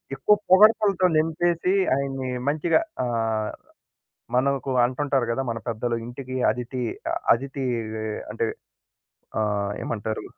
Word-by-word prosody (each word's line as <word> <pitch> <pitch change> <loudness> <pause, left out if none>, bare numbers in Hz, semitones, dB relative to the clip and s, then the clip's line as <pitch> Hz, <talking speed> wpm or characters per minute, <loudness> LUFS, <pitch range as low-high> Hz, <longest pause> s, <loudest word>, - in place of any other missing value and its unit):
ఎక్కువ 210 +9 +4
పొగడ్తలతో 200 -1 +5
నింపేసి 170 +3 +1 0.2
ఆయన్ని 135 -1 -2 0.2
మంచిగా 155 - +2 0.3
ఆహ్, 115 -2 -1 0.8
మనకు 135 0 +1
అంటుంటారు 135 0 0
గదా! 135 +3 -1
మన 115 - -2
పెద్దలు 115 +1 -1
ఇంటికి 130 +2 -7 0.2
అదితి 125 +2 -4 0.5
అథితీ 135 +3 -3 0.7
అంటే 115 +1 0 1.0
ఆహ్, 100 -1 -1
ఏమంటారు? 110 -1 -3
130 Hz, 100 wpm, -24 LUFS, 115-155 Hz, 1.0 s, పొగడ్తలతో